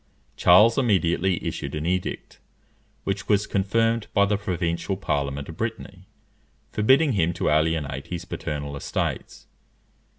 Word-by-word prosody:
Charles 105 +8 +6
immediately 95 -6 +1
issued - - -4
an 75 +1 -3
edict, 90 +1 -3 0.6
which - - -3
was 105 0 +3
confirmed 115 +3 0
by 100 - +5
the 105 +1 +1
provincial 90 -1 -2
Parliament 70 -5 -2
of 80 - -9
Brittany, 105 -5 -5 0.6
forbidding 135 +8 +4
him 85 -6 +1
to - - -1
alienate 75 -3 0
his 85 0 -5
paternal 75 -4 -5
estates. 70 - -4
90 Hz, 125 wpm, -24 LUFS, 80-105 Hz, 0.6 s, Charles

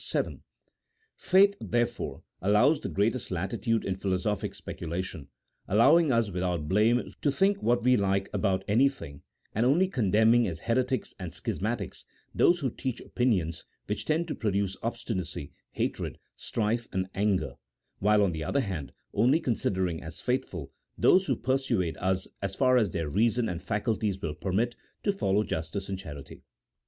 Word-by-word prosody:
Vii. - - -1 0.7
Faith, 200 +2 +4
there 120 0 +2
fore, 120 - -7 0.2
allows 120 - +4
the - - -4
greatest 110 +4 0
latitude 100 +6 -1
in 95 - -1
philosophic 95 +1 -1
speculation, 85 -3 -5 0.4
allowing 140 - +5
us 115 -4 +2
without 90 -4 -1
blame 110 +6 +2
to 145 - +2
think 195 +7 +2
what 120 0 +2
we 125 +1 +5
like 100 -2 +1
about 95 -2 +1
anything, 115 - +1 0.3
and 110 - +1
only 155 +10 +4
condemning, 115 - +3
as 80 -3 -5
heretics 125 +2 0
and 90 -3 -5
schismatics, - - -3 0.3
those 175 -1 +4
who 130 -4 0
teach 130 0 -4
opinions 90 -10 0 0.2
which - - -3
tend 160 +2 +1
to 155 - -2
produce 100 -3 -1
obstinacy, 115 - -4 0.2
hatred, - - -2 0.2
strife, 115 +1 -1
and 95 0 -1
anger; 100 -1 0 0.5
while, 105 +1 +4
on 95 - +2
the 80 -1 -4
other 140 - +1
hand, 85 - -4 0.2
only 125 +9 +4
considering 95 - -1
as 80 0 -8
faithful 95 - -2 0.3
those 190 0 +5
who - - +2
persuade 120 - 0
us, 95 0 -1
as 100 -1 -3
far 130 -1 +4
as 110 -5 +3
their 80 -2 -2
reason 115 +8 +2
and 85 -3 -4
faculties 105 0 -1
will 80 -5 -3
permit, 100 +9 -1 0.3
to 200 - +2
follow 105 - +1
justice 80 +3 -4
and 95 -1 -3
charity. 75 -7 -9
105 Hz, 155 wpm, -28 LUFS, 95-125 Hz, 0.7 s, allowing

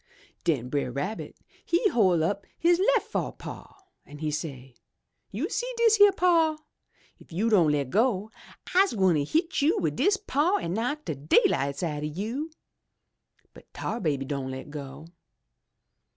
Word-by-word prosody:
Den 135 -7 0
Brer 140 -1 -2
Rabbit 145 - -4 0.3
he 340 - +1
hoi' 185 - +3
up 200 +4 -2
his 345 +1 +3
lef 460 +3 +3
fo' - - -3
paw 390 - -11 0.2
an' 145 - -12
he 155 0 -2
say, 135 -4 -6 0.6
*You - - -3
see - - -3
dis 455 -2 +4
yere 410 0 +8
paw. 335 -4 +3 0.6
If - - -19
you 210 +7 0
don' 175 -7 +5
le' 145 -1 +1
go, 215 - 0 0.4
I'se 380 +2 +4
gwine 185 -8 +2
hit 320 - 0
you 320 +9 +3
wid - - -1
dis 405 0 +3
paw 355 0 +1
an' 170 - -3
knock 250 +8 -2
de - - -2
dayUghts 140 +1 +2
out 150 -3 -2
o' - - -3
you!' 220 - -4 1.0
But - - -17
Tar 230 - -3
Baby 145 - -1
don' 135 -1 -3
le' 130 0 -6
go! 145 0 -9
195 Hz, 160 wpm, -27 LUFS, -, 1.0 s, yere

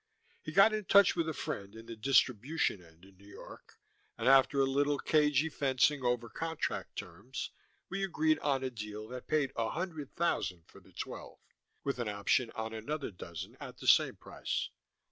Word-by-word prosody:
He 155 - -6
got 195 +6 +6
in 215 -2 -2
touch 200 +1 +6
with 165 -2 0
a - - 0
friend 100 -8 -5
in 110 0 -10
the 115 - -7
distribution 125 - +2
end 85 +2 -19
in 95 -1 -19
New 100 +2 -18
York, 100 - -13 0.4
and 115 - -1
after 135 +1 +6
a 135 - +5
little 140 +2 +1
cagy 150 0 +3
fencing 140 -1 +1
over 120 -1 0
contract 160 +7 -3
terms, - - -6 0.4
we 195 0 -3
agreed 160 -4 +2
on 135 -2 0
a 130 - -2
deal 105 -2 -7
that 125 0 -8
paid 150 -3 +1
a 115 -1 0
hundred 160 -5 -5
thousand 90 - 0
for - - -16
the - - -21
twelve, - - -7 0.5
with 140 -2 -2
an 120 -3 -1
option 105 +4 +1
on 110 0 -4
another 135 +5 -4
dozen 85 -3 -8
at - - -9
the - - -10
same - - +5
price. - - -4
135 Hz, 185 wpm, -32 LUFS, 110-155 Hz, 0.5 s, got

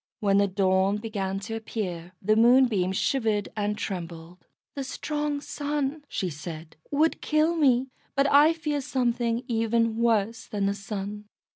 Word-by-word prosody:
When 200 -1 +3
the 200 - +3
dawn 190 +1 +2
began 200 -3 -3
to 225 +3 -6
appear, 185 -6 -5
the 215 +3 +3
Moonbeam 230 -5 +4
shivered 215 -1 0
and 210 0 -1
trembled. 170 -2 -6 0.3
"The 275 - -4
strong 295 +2 -3
Sun," 290 0 -3
she 190 - -2
said, 160 0 -8
"would 305 +3 +1
kill 310 +2 +2
me, 265 -4 +3 0.2
but 275 0 +3
I 295 +3 +7
fear 300 -3 -2
something 240 -2 0
even 230 -1 +1
worse 225 -1 +1
than 205 -2 -2
the 200 - +1
Sun. 205 +1 -6
225 Hz, 145 wpm, -26 LUFS, 195-270 Hz, 0.3 s, I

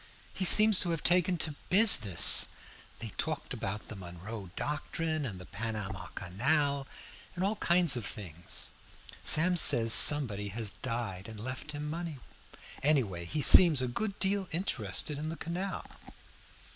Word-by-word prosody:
He 190 - -3
seems 215 +2 +7
to 175 - 0
have 165 -3 -6
taken 180 0 +1
to 155 -1 -2 0.2
business. 180 - +6 0.5
They 115 - -8
talked 155 -3 -5
about 105 -3 -8
the 110 - -11
Monroe 95 +2 -11
doctrine 155 0 -6
and 95 -6 -11
the 90 - -13
Panama 100 -3 -8
canal, 140 - -4 0.5
and 180 - -6
all 205 +2 -4
kinds 175 -7 0
of 120 - -7
things. 90 -6 -7 0.5
Sam 180 +4 +4
says 120 -9 +7
somebody 115 -9 +4
has 105 0 -6
died 115 -6 -7
and 110 -2 -12
left 130 +6 -9
him 150 +1 -8
money. 165 -1 -8 0.6
Anyway, 115 - -2
he 145 - -4
seems 170 -7 +7
a 130 - -4
good 200 - -7
deal 195 0 -3
interested 145 - -4
in 155 +1 -7
the 165 - -9
canal." 185 +4 -8
140 Hz, 145 wpm, -27 LUFS, 105-170 Hz, 0.6 s, seems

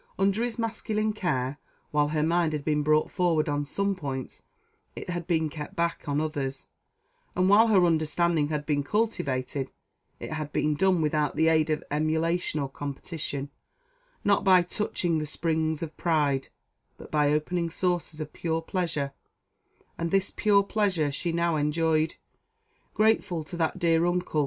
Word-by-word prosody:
Under 195 +4 +2
his 240 -1 -3
masculine 215 -1 -1
care, 145 -8 -1 0.3
while 150 0 +3
her 150 0 0
mind 165 0 +2
had 150 -2 -3
been 150 -1 +2
brought 155 +1 +2
forward 170 -4 +1
on 145 0 0
some 200 +7 0
points, 135 -7 -5 0.5
it - - -5
had 175 -1 -4
been 160 -3 +2
kept 150 +5 -7
back 170 -3 -1
on 145 +1 +1
others, 140 -3 -3 0.7
and 185 0 +3
while 215 +3 +7
her 195 -5 +5
understanding 160 -1 +2
had 150 -1 -3
been 145 -2 +1
cultivated, 140 - -1 0.5
it - - -6
had 155 -1 -4
been 150 0 +1
done 185 +1 +2
without 150 -1 0
the 160 0 +4
aid 160 -1 +3
of 155 - 0
emulation 160 +2 0
or 140 - -1
competition; 140 0 -5 0.7
not 200 -1 +3
by 185 -2 +6
touching 175 -3 -1
the 150 - -2
springs 160 0 -1
of 160 -1 -6
pride, 145 -5 +1 0.5
but - - -12
by 150 -1 +3
opening 170 +3 0
sources 175 -2 -1
of 155 -1 -6
pure 165 -1 -2
pleasure; 160 -6 -2 0.9
and 170 0 -1
this 195 +2 +1
pure 205 -2 +3
pleasure 195 -8 0
she 170 +5 -2
now 170 -1 +1
enjoyed, 155 +1 +1 0.8
grateful 210 -6 +2
to 150 +3 -8
that 165 +1 0
dear 165 -2 +3
uncle. 175 -3 0
160 Hz, 160 wpm, -27 LUFS, 150-180 Hz, 0.9 s, while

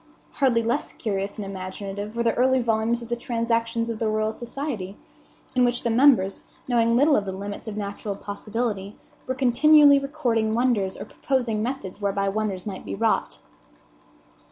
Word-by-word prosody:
Hardly 250 -5 +2
less 230 +1 -1
curious 200 -2 -3
and 210 - -4
imaginative 195 +2 -6
were 235 - 0
the 230 -1 +2
early 260 +1 +3
volumes 230 0 0
of 235 - -10
the 240 - 0
Transactions 230 -1 -1
of 230 -2 -4
the 225 - 0
Royal 215 0 0
Society, 235 -5 -5 0.6
in 250 - +4
which 245 0 +1
the 235 - +1
members, 230 -6 +4 0.3
knowing 235 -2 +3
little 285 +4 +5
of 205 - +1
the 190 - -3
limits 200 +3 -7
of 210 -1 -5
natural 205 0 -4
possibility, 205 0 -4 0.3
were 260 - -1
continually 285 +3 +6
recording 240 -6 0
wonders 230 -6 +1
or - - -7
proposing 245 -6 -1
methods 215 -5 -4
whereby 200 0 0
wonders 200 -3 -2
might 195 -3 -6
be 100 - -5
wrought. - - 0
230 Hz, 165 wpm, -24 LUFS, 200-245 Hz, 0.6 s, continually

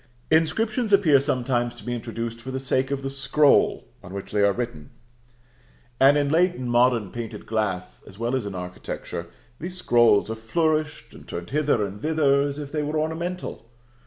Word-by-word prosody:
Inscriptions 215 +8 +1
appear 170 -9 +6
sometimes 125 -3 0
to 120 - -13
be 120 - -2
introduced 115 0 -5
for 130 - -8
the 130 0 -3
sake 130 0 0
of 140 -1 -3
the 135 - -2
scroll 140 +1 +3
on 90 +2 -10
which 100 - -6
they 105 - +1
are 100 0 +5
written; 115 -10 -5 1.1
and 140 +2 +6
in 145 -1 +1
late 175 +4 +3
and 125 -1 -4
modern 120 -4 +3
painted 115 -2 -6
glass, 100 -5 -2
as 95 - -13
well 120 +3 -1
as 125 -6 -2
in 100 - -6
architecture, 90 -1 -6 0.3
these 180 +2 -6
scrolls 120 - +4
are - - -3
flourished 155 +2 -1
and - - -14
turned 85 +4 -6
hither 145 -7 +2
and 100 +1 -8
thither 150 -3 +3
as 140 0 -2
if 145 -1 -6
they 155 - -1
were 150 +1 -2
ornamental. 160 -4 -4
130 Hz, 185 wpm, -24 LUFS, 115-150 Hz, 1.1 s, appear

